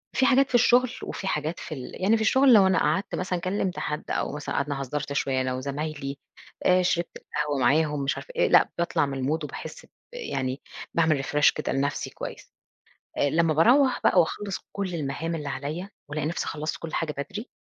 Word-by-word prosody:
في 260 - +3
حاجات 275 +1 +4
في 245 - 0
الشغل، 245 +1 +5
وفه 195 - -5
حاجات 165 -2 -2
في 155 - -6
ال 130 +7 -8
يعني 210 +4 +4
في 220 - -1
الشغل 260 +3 +5
لو 195 -3 +7
أنا 185 -3 +3
قعدت 155 +7 0
مثلًا 180 -1 -2
كلمت 185 0 -2
حد، 150 +1 -4
أو - - -1
مثلًا 150 - -4
قعدنا 140 -1 -1
هزرت 140 +2 -3
شوية 135 -2 0
أنا 130 0 -1
وزمايلي، 140 +1 -4 0.5
آآ، 185 0 +5
شربت 175 -1 -1
القهوة 150 -1 -3
معاهم 150 +1 +2
مش 135 - 0
عارف - - -9
إيه، - - +3
لأ، - - +5
باطلع 170 -3 +1
من 135 -2 -3
الmood 155 +2 0
وباحس - - -7
ب - - -28 0.2
يعني 135 - -3 0.3
باعمل 155 -4 +2
refresh 145 +2 +4
كده 150 - -2
لنفسي 140 +1 -1
كويس. - - -8 0.7
آآ، 145 - +2
لمّا 165 -1 +2
باروّح 250 - +4
بقى 180 - +6
وأخلص 195 +4 -2
كل 195 -3 -3
المهام 160 +2 -3
اللي 150 -3 -4
عليّا، 155 +8 -4 0.2
وألاقي 150 0 -2
نفسي 170 - -2
خلصت 155 0 -3
كل 165 - -7
حاجة 155 -2 -1
بدري، 205 - -5
160 Hz, 200 wpm, -26 LUFS, 140-190 Hz, 0.7 s, لو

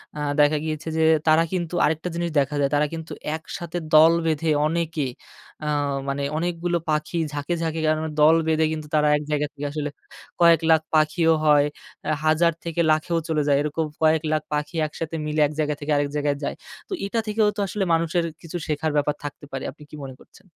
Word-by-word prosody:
অ্যা 150 - -4 0.2
দেখা 150 +1 +5
গিয়েছে 155 0 -4
যে, 160 - +2 0.3
তারা 160 +1 +5
কিন্তু 175 -1 -2
আরেকটা 160 +3 -1
জিনিস 170 0 -1
দেখা 140 +2 0
যায়। 140 - +2
তারা 145 +1 +3
কিন্তু 160 0 -7 0.2
একসাথে 165 +1 -6 0.2
দল 160 +2 +8
বেঁধে 160 0 0 0.2
অনেকে, 165 -2 -1 0.6
অ্যা 150 - -2 0.4
মানে 140 +1 -2
অনেকগুলো 175 +1 -1
পাখি 155 +2 -1 0.2
ঝাঁকে, 145 +3 -2
ঝাঁকে 160 -1 -2
কারণ 155 0 +2
ওরা 160 - -3
দল 155 +2 +7
বেঁধে 160 0 +3
কিন্তু, 155 -1 -6
তারা 150 0 +3
১ - - -5
জায়গা 150 0 +1
থেকে 145 0 -6
আসলে 150 -1 -3 0.5
কয়েক 170 -2 +6
লাখ 160 -1 +5
পাখিও 160 +2 +3
হয়, 145 -1 +5 0.4
আ - - 0 0.2
হাজার 160 +2 +4
থেকে 170 0 -1
লাখেও 155 +2 +1
চলে 160 -2 +1
যায়। 140 -1 +4
এরকম 150 +2 -1 0.2
কয়েক 155 0 +4
লাখ 155 - +1
পাখি 150 +2 -2
একসাথে 165 +1 -6
মিলে, 150 +1 -2
১ 145 - -8
জায়গা 150 -1 +1
থেকে 150 +1 -3
আরেক 145 0 +1
জায়গায় 145 -1 0
যায়। - - -2 0.3
তো 395 - -3
এটা 215 +3 -1
থেকেও 215 0 +2
তো 205 - -6
আসলে 195 +1 -2
মানুষের 165 +1 +1 0.2
কিছু 170 +1 -6
শেখার 155 +1 -1
ব্যাপার 145 0 +1
থাকতে 145 0 -7
পারে। 135 - -4
আপনি 150 - -16
কি 150 - -10
মনে 130 -1 -8
করছেন? - - -20
155 Hz, 200 wpm, -23 LUFS, 150-165 Hz, 0.6 s, দল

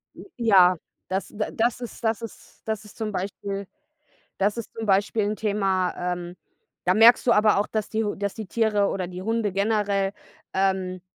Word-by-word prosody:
J - - -11
ja, 190 -6 +6 0.3
das 190 +1 -2
d 210 0 -3
das 240 +2 0
ist 240 0 -8
das 225 -1 0
ist 230 -3 -11
das 220 -1 -3
ist 210 - -15
zum 220 -2 -3
Beispiel 195 +1 -4 0.7
das 200 +2 +1
ist 230 - -6
zum 225 -1 -5
Beispiel 205 +2 +2
'n 210 +1 -1
Thema, 195 -4 0 0.2
ähm, 175 0 -8 0.5
da 185 - +3
merkst 230 +4 +7
du 240 - +6
aber 210 -2 +4
auch, 205 - +1
dass 215 -2 -3
die 220 0 -1
H 205 - -1
dass 200 0 -3
die 220 -2 -6
Tiere 210 -1 +1
oder 185 -2 -2
die 180 +1 -7
Hunde 220 -1 0
generell, 200 -1 +1 0.4
ähm, 190 -1 0
205 Hz, 190 wpm, -25 LUFS, 195-220 Hz, 0.7 s, merkst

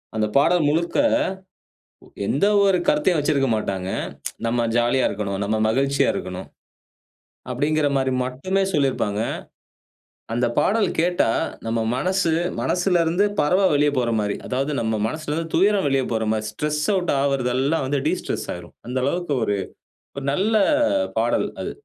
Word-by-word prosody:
அந்த 110 -1 +1
பாடல் 165 +2 +3
முழுக்க 170 +3 0 1.3
எந்த 145 - +2 0.2
ஒரு 190 -2 +3
கருத்தையும் 150 +3 +3
வச்சிருக்க 140 -3 +1
மாட்டாங்க. 95 -3 -3 0.6
"நம்ம 120 0 +1
ஜாலியா 120 +2 +2
இருக்கணும், 100 -1 -3
நம்ம 110 +2 0
மகிழ்ச்சியா 140 +3 +2
இருக்கணும்" 90 0 -6 1.0
அப்டிங்குற 145 +4 +1
மாரி 130 0 0
மட்டுமே 185 +10 -1
சொல்லியிருப்பாங்க. 130 - 0 1.1
அந்த 120 +1 +1
பாடல் 215 +1 +2
கேட்டா 175 -5 +2 0.4
நம்ம 115 0 0
மனசு, 180 +4 +1 0.3
மனசுல 180 -1 +1
இருந்து 175 +5 +2 0.2
பறவ 180 +7 +2
வெளிய 145 0 +3
போற 120 -2 +1
மாதிரி, 105 -1 -1
அதாவது 135 +3 -1
நம்ம 110 -1 -1
மனசுல 155 +3 -4
இருந்து 165 +1 -3
துயரம் 195 -2 +3
வெளிய 135 -1 +2
போற 110 -1 0
மாரி, 110 -1 -2
ஸ்ட்ரெஸ் 150 +6 -2
அவுட் 180 -2 0
ஆவுறதெல்லாம் 135 +2 0
வந்து 140 +1 0
டிஸ்ட்ரெஸ் 180 - -2
ஆயிரும். 85 -1 -11
அந்த 130 +1 -1
அளவுக்கு 170 0 -1
ஒரு, 105 -2 0 0.6
ஒரு 140 0 -5
நல்ல 215 +7 +1 0.6
பாடல் - - +1
அது. - - -5
140 Hz, 135 wpm, -22 LUFS, 120-170 Hz, 1.3 s, பாடல்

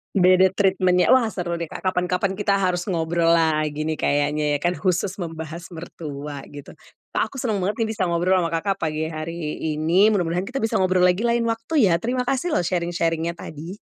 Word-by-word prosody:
Beda 185 0 +5
treatment-nya. 185 -2 +2
Wah, 255 0 +5
seru 175 -2 -3
deh 170 - -3
Kak. - - -8
Kapan-kapan 185 +1 0
kita 205 0 0
harus 180 -2 0
ngobrol 170 -2 +1
lagi 155 -2 +1
nih 155 - -1
kayaknya 145 +1 0
ya - - -4
kan, 175 +2 0
khusus 185 +1 -1
membahas 165 -1 -6
mertua, 150 -4 -7
gitu. 145 -1 -11 0.4
Kak - - 0
aku - - -10
seneng 220 -5 -1
banget 205 +4 -2
nih 225 - +1
bisa 185 - +1
ngobrol 175 +2 +2
ama 170 -2 0
Kakak, 195 +4 0
pagi 160 -2 -2
hari 155 0 -5 0.2
ini, 170 +8 +3
mudah-mudahan 180 -1 0
kita 260 +5 -4
bisa 225 - 0
ngobrol 185 -1 +2
lagi 180 +5 +2
lain 235 0 +2
waktu 230 - +1
ya, 170 - +3
terima 250 +3 -1
kasih 275 +5 0
loh, - - +2
sharing-sharing-nya 170 -1 -1
tadi. 155 0 -9
175 Hz, 190 wpm, -23 LUFS, 165-195 Hz, 0.4 s, Beda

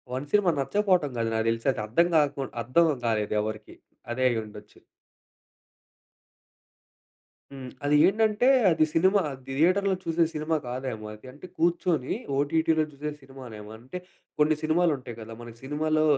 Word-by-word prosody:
1 130 +3 -4
cinema 205 -4 +4
నచ్చకపోవటం 180 -1 +1
కాదు. 115 -1 0
నాకు 110 0 0
తెలిసి 115 +3 -2
అది 120 - -5
అర్థం 145 +11 +2
కాకపో 145 -3 +2 0.2
అర్థం 160 +7 +3
కాలేదు 110 -3 0
ఎవరికీ. 110 0 -6 0.4
అదే 130 +2 -1
అయ్యిఉండొచ్చు. 105 -3 -6 2.7
హ్మ్. 130 -2 -8 0.2
అది 145 +1 +3
ఏంటంటే, 220 +3 +2 0.2
అది 160 -1 +3
సినిమా 190 +4 +4
అది 135 -1 -9 0.2
థియేటర్‌లో 190 +4 +3
చూసే 165 0 +1
సినిమా 155 +1 -1
కాదేమో. 125 -3 -5 0.3
అంటే 150 +6 -12
కూర్చొని 170 -5 +1 0.2
ఓటీటీలో 160 +2 +2
చూసే 150 +1 -5
సినిమానేమో. 125 -6 -11
అంటే 125 +10 -8 0.4
కొన్ని 155 +1 +4
సినిమాలు 165 +2 +2
ఉంటాయి 125 -3 -9
కదా! 110 +1 -9
మనకు 120 -1 -11
సినిమాలో 155 +2 0
145 Hz, 135 wpm, -26 LUFS, 120-165 Hz, 2.7 s, సినిమా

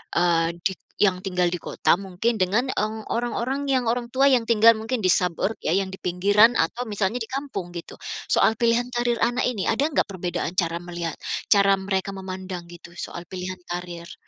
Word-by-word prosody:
eee, 170 -1 +3
di 190 - +2 0.3
yang 190 -3 +4
tinggal 180 -2 +1
di - - -1
kota - - +2
mungkin 195 +4 -1
dengan, 210 +8 +2
eee, 215 +1 -2
orang-orang 240 +3 -1
yang 255 -2 +2
orang 240 0 -2
tua 270 +2 +4
yang 245 -3 +4
tinggal 230 0 +7
mungkin 225 +3 -3
di 185 - +2
suburb, 180 +5 +1
yang 190 +3 +1
di - - -8
pinggiran 200 +6 +4
atau 230 +10 0
misalnya 205 +3 -1
di - - -11
kampung 260 -11 -4
gitu? 170 - -7 0.3
Soal 220 - +4
pilihan 235 +1 +2
karir 240 -1 0
anak 245 +1 +1
ini, 225 -6 -2
ada 275 +7 +2
nggak 310 - +1
perbedaan 175 -2 -3
cara 170 -2 +1
melihat 170 -2 -4 0.4
cara 200 -1 +6
mereka 190 0 -2
memandang 185 -2 -6
gitu, 170 0 -13
soal 175 0 -6
pilihan 185 0 -6
karir? 175 -1 -6
195 Hz, 180 wpm, -24 LUFS, 180-235 Hz, 0.4 s, tinggal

